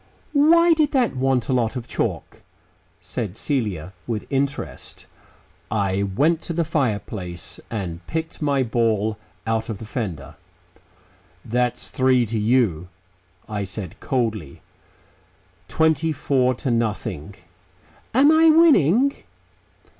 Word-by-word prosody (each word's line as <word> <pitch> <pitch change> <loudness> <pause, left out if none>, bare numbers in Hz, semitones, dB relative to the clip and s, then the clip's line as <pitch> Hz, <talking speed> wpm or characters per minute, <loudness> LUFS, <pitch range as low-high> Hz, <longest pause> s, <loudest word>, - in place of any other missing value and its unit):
"Why 335 +4 +6
did 310 -2 +1
that 250 - +2
want 130 -1 +1
a 130 - 0
lot 120 -1 0
of 125 -2 -5
chalk?" - - -3 0.6
said 110 -5 -5
Celia 100 - -2
with 110 -3 -3
interest. 140 +1 -3 0.6
I 100 -2 0
went 145 - +1
to 170 - -4
the 165 0 0
fireplace 105 - -3
and 95 -7 -4
picked 160 0 -4
my 140 -3 +2
ball 110 -3 0 0.3
out 115 0 -1
of 110 - -3
the 110 - -9
fender. 100 - -5 1.1
"That's 125 +1 -1
three 130 -2 +3
to 110 0 -2
you," 105 -7 +1 0.6
I 105 -2 -3
said 95 -2 -6
coldly. 110 - -2 1.0
"Twenty 160 0 +2
four 130 -3 +1
to 130 +1 -2
nothing." 110 -10 -2 0.8
"Am 275 +5 +5
I 320 +1 +6
winning?" 280 - +5
125 Hz, 115 wpm, -22 LUFS, 105-155 Hz, 1.1 s, Why